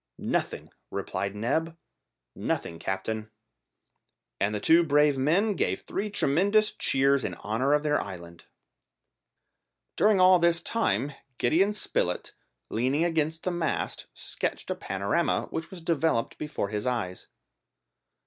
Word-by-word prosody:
"Nothing," - - -2 0.2
replied 100 0 -3
Neb; 160 +10 -1 0.6
"nothing, 85 0 -3
captain." 110 +4 -3 1.1
And 100 +2 +1
the - - -1
two 165 +10 +5
brave 150 -2 +4
men 170 +11 +2
gave - - -1
three 210 +2 -3
tremendous 200 +5 +2
cheers 135 0 +2
in - - -3
honour 120 +7 0
of 150 0 +2
their 150 -1 +2
island! 85 -3 -9 1.5
During 210 -2 +4
all 185 0 +7
this 170 0 +3
time 145 - 0 0.2
Gideon 175 +11 +3
Spilett, 140 - -2 0.4
leaning 130 +8 +1
against 160 -1 0
the 185 - 0
mast, 170 -3 -2
sketched - - -4
the - - 0
panorama - - 0
which 160 0 -4
was 180 -3 -10
developed 160 -7 0
before 150 -9 -3
his 105 +2 -3
eyes. 110 -8 -2
150 Hz, 125 wpm, -27 LUFS, 110-170 Hz, 1.5 s, all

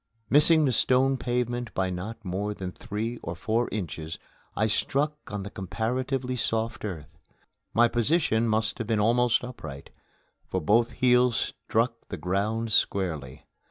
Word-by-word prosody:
Missing 155 +2 +6
the 130 - +2
stone 130 +2 +3
pavement 120 -1 -2
by 95 -1 0
not 100 +5 -6
more 100 +3 -2
than 95 -2 -5
three 110 +6 -4
or 80 - -5
four 115 +7 0
inches, 80 -5 -4 0.4
I 110 - +2
struck 140 +7 0 0.2
on 105 -1 -3
comparatively 125 +7 -2
soft 115 -3 -1
earth. 80 -7 -6 0.6
My 120 +1 +6
position 120 -1 +2
must 110 +2 0
have 115 - -3
been 110 -2 +1
almost 120 +3 +3
upright, 90 - -8 0.6
for 95 - -1
both 115 +7 +3
heels 125 -1 +4
struck 115 0 -1
the - - -4
ground 105 +5 -1
squarely. 80 -11 0
115 Hz, 140 wpm, -27 LUFS, 100-125 Hz, 0.6 s, Missing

